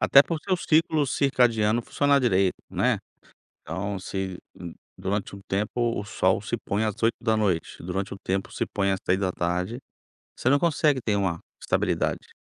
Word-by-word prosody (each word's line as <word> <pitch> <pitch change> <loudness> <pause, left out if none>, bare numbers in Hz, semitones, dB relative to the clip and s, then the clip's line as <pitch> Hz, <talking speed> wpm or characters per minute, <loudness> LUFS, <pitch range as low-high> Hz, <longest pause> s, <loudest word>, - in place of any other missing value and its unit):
Até 140 - +7
para 165 - -3
o - - -5
seu 185 -2 +1
ciclo 155 -3 +2
circadiano 120 -5 +2
funcionar 140 +3 +2
direito, 95 -7 +3 0.2
né. - - +1 0.6
Então 95 +5 -4
se, 95 0 -4 0.2
hum, 85 -2 -8 0.2
durante 100 +1 -2
um 100 - -11
tempo 115 +4 0
o 105 - -4
sol 95 -2 +1
se 115 +3 -2
põe 105 -1 -1
às 105 -2 -2
20h, 110 -7 0
durante 95 +3 -3
um 100 - -8
tempo 95 +1 -2
se - - -2
põe 100 -1 0
às 95 - -1
15h, 90 +3 -1 0.6
você - - 0
não 140 +2 +5
consegue 150 -4 +2
ter 105 -3 0
uma 95 -4 0 0.2
estabilidade. - - 0
105 Hz, 165 wpm, -26 LUFS, 95-125 Hz, 0.6 s, Até